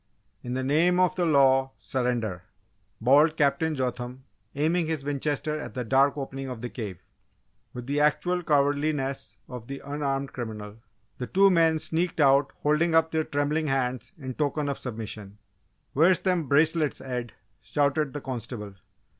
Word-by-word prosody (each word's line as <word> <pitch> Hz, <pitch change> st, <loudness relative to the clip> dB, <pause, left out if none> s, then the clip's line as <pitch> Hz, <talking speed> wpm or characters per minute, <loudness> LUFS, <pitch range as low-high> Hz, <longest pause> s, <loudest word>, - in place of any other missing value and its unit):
"In 125 Hz, 0 st, -4 dB
the 130 Hz, -, -1 dB
name 165 Hz, +7 st, +3 dB
of 185 Hz, -1 st, +3 dB
the 175 Hz, -2 st, +1 dB
law, 135 Hz, -3 st, +4 dB
surrender!" 120 Hz, -8 st, -2 dB, 0.6 s
bawled 145 Hz, +7 st, +4 dB
Captain 160 Hz, +2 st, +2 dB
Jotham, 125 Hz, 0 st, -4 dB, 0.3 s
aiming 160 Hz, +3 st, +1 dB
his 155 Hz, -4 st, -3 dB
Winchester 145 Hz, +2 st, -1 dB
at -, -, -8 dB
the 125 Hz, -, -2 dB
dark 135 Hz, +4 st, +3 dB
opening 135 Hz, -1 st, -5 dB
of 125 Hz, -3 st, -6 dB
the 125 Hz, -, -5 dB
cave. 105 Hz, -7 st, -6 dB, 0.7 s
With 125 Hz, -1 st, -7 dB
the 140 Hz, +3 st, -1 dB
actual 175 Hz, +4 st, +2 dB
cowardliness 145 Hz, -2 st, 0 dB
of 125 Hz, -3 st, -8 dB
the 140 Hz, 0 st, -6 dB
unarmed 140 Hz, -1 st, -2 dB
criminal, 110 Hz, -3 st, -6 dB, 0.4 s
the 125 Hz, -, -3 dB
two 195 Hz, +1 st, +5 dB
men 165 Hz, -2 st, +4 dB
sneaked 165 Hz, +2 st, -1 dB
out 140 Hz, -1 st, +4 dB
holding 160 Hz, +3 st, +2 dB
up 160 Hz, 0 st, +4 dB
their 160 Hz, 0 st, +1 dB
trembling 150 Hz, +2 st, -1 dB
hands 130 Hz, -3 st, -1 dB
in 130 Hz, -4 st, -6 dB
token 145 Hz, +1 st, -1 dB
of 140 Hz, -, -3 dB
submission. 110 Hz, -4 st, -7 dB, 0.6 s
"Where's 170 Hz, +5 st, +4 dB
them 180 Hz, -5 st, 0 dB
bracelets, 155 Hz, +2 st, +2 dB
Ed?" 125 Hz, -3 st, -5 dB, 0.3 s
shouted 145 Hz, 0 st, 0 dB
the 145 Hz, -, -5 dB
constable. 115 Hz, -5 st, -6 dB
140 Hz, 155 wpm, -26 LUFS, 125-155 Hz, 0.7 s, two